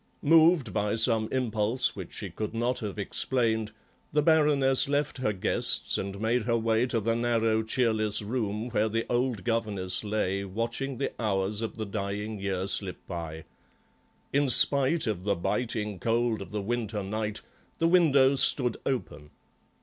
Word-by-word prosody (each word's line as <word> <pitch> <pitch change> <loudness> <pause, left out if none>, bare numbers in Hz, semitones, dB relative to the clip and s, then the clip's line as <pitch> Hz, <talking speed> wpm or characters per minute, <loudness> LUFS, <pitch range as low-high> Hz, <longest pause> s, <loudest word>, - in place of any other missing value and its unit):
Moved 160 - +4
by 105 0 0
some 110 -1 +3
impulse 120 -1 0
which - - -8
she - - -6
could 110 +1 -5
not 120 +2 -1
have 105 -3 -5
explained, 110 +1 0 0.4
the 150 0 +2
Baroness 145 -4 +3
left 145 -1 -1
her 115 -4 0
guests 95 -3 0
and 100 0 -4
made 115 +3 +1
her 115 -1 +1
way 115 +2 +1
to 120 -2 -1
the 115 +2 0
narrow, 115 -2 +1
cheerless 110 -2 0
room 110 0 -3
where 110 -2 0
the 115 +1 -1
old 120 -3 0
governess 105 -6 -1
lay 100 -2 -1
watching 115 +7 -4
the 140 - -2
hours 100 0 -1
of 115 - -4
the 110 - -3
dying 100 +1 -4
year 95 -1 -2
slip 100 -1 +1
by. 80 -3 -6 0.9
In 140 0 +2
spite 140 +5 +4
of 105 -6 -3
the 100 0 +1
biting 105 +1 -2
cold 115 -1 0
of - - -8
the 105 -1 -4
winter 110 -2 -2
night, 105 +2 -3 0.4
the 165 - +2
window 140 -6 +4
stood 125 -3 +4
open. 80 - -4
110 Hz, 155 wpm, -28 LUFS, 105-125 Hz, 0.9 s, Moved